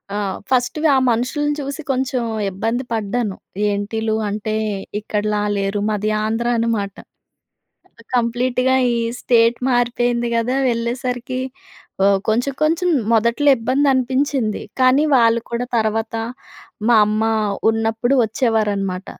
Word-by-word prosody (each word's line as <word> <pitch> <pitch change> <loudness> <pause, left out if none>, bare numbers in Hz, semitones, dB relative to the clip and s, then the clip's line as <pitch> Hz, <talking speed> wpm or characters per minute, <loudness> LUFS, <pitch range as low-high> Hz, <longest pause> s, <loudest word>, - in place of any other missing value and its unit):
ఆహ్, 200 -2 -2 0.2
ఫస్ట్‌‌గా 260 +5 +2
ఆ - - +4
మనుషుల్ని 290 +6 0
చూసి 280 +3 -5
కొంచెం 255 -1 -1 0.3
ఇబ్బంది 225 +6 -2
పడ్డాను. 215 -1 -2 0.3
ఏంటీల్లు 215 +2 -2 0.2
అంటే 215 +1 -3 0.5
ఇక్కడలా 210 0 -1 0.2
లేరు 195 +1 -1
మాది 210 0 -1
ఆంధ్ర 225 +2 -1
అనమాట. 220 -4 -1 1.2
కంప్లీట్‌గా 250 +2 +1 0.2
ఈ - - 0 0.3
స్టేట్ 235 -1 +3
మారిపోయింది 240 0 +1
కదా. 240 +3 0
వెళ్ళేసరికి 245 +2 -2 0.6
ఒ - - +5 0.2
కొంచెం 245 +5 +1
కొంచెం 330 +4 +2 0.2
మొదట్లో 235 +6 +3
ఇబ్బందనిపించింది. 260 -1 +1 0.2
కానీ 260 +3 +4
వాళ్ళు 230 -1 +4
కూడా 235 +1 -1
తర్వాత 220 +1 -1 0.7
మా 240 - +5
అమ్మ 215 +1 0 0.5
ఉన్నప్పుడు 225 +3 0
వచ్చేవారనమాట. 205 -5 -1
235 Hz, 105 wpm, -19 LUFS, 215-255 Hz, 1.2 s, ఒ